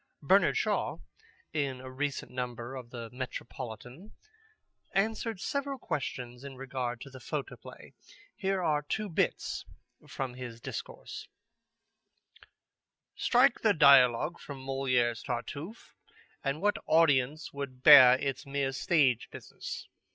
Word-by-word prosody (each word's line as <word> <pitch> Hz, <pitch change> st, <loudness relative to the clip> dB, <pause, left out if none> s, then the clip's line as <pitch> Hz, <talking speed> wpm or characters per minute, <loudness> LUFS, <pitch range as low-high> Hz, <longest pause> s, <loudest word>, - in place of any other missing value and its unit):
Bernard -, -, +4 dB
Shaw, -, -, 0 dB, 0.6 s
in 140 Hz, -4 st, -1 dB
a 130 Hz, 0 st, -9 dB
recent 140 Hz, +1 st, -3 dB
number 125 Hz, 0 st, -5 dB
of 125 Hz, -3 st, -8 dB
the 115 Hz, -2 st, -8 dB
Metropolitan, 125 Hz, -, -7 dB, 0.8 s
answered 220 Hz, +1 st, 0 dB
several 280 Hz, +7 st, -2 dB
questions 125 Hz, -, -4 dB
in 140 Hz, -1 st, -8 dB
regard 125 Hz, -2 st, -4 dB
to 140 Hz, -, -9 dB
the 130 Hz, -, -10 dB
photoplay. -, -, -7 dB, 0.4 s
Here 190 Hz, -1 st, -1 dB
are 150 Hz, -3 st, +2 dB
two 210 Hz, +8 st, -3 dB
bits 165 Hz, -, -1 dB, 0.4 s
from 130 Hz, -2 st, -4 dB
his 120 Hz, -2 st, -8 dB
discourse: -, -, -7 dB, 1.9 s
"Strike -, -, +3 dB
the -, -, +3 dB
dialogue 140 Hz, 0 st, +6 dB
from 135 Hz, -2 st, -9 dB
Molière's 130 Hz, -4 st, +1 dB
Tartuffe, 140 Hz, -, -6 dB, 0.5 s
and 140 Hz, +5 st, -2 dB
what 205 Hz, 0 st, +2 dB
audience 150 Hz, -2 st, +3 dB
would 135 Hz, -2 st, -7 dB
bear 130 Hz, -4 st, +10 dB
its 135 Hz, -1 st, -3 dB
mere 140 Hz, -1 st, -1 dB
stage 130 Hz, -2 st, +2 dB
business? -, -, -8 dB
135 Hz, 115 wpm, -30 LUFS, 125-150 Hz, 1.9 s, bear